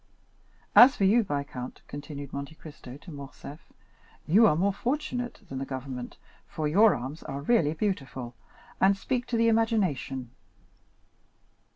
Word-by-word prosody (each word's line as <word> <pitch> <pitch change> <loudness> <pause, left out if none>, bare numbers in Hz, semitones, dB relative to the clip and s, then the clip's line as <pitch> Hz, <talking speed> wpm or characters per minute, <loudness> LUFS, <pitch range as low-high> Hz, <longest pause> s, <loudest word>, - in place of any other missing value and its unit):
As 255 +3 +9
for - - -1
you, 210 +5 +5
viscount," 140 -6 -5
continued 145 -1 -8
Monte 140 +3 -6
Cristo 145 -5 -11
to 170 +4 -12
Morcerf, 140 +1 -9 0.7
"you 215 +8 +6
are 150 - +3
more 195 +5 +1
fortunate 250 +1 -3
than 135 -4 -5
the - - -3
government, 130 -2 -6 0.3
for 155 -1 -3
your 205 +8 +5
arms 130 +6 -6
are 140 +1 -6
really 155 -3 +2
beautiful, 135 - -3 0.5
and 195 +1 +4
speak 245 +4 -2
to 235 - -1
the 230 0 +3
imagination. 190 - 0
155 Hz, 140 wpm, -28 LUFS, 140-220 Hz, 0.7 s, As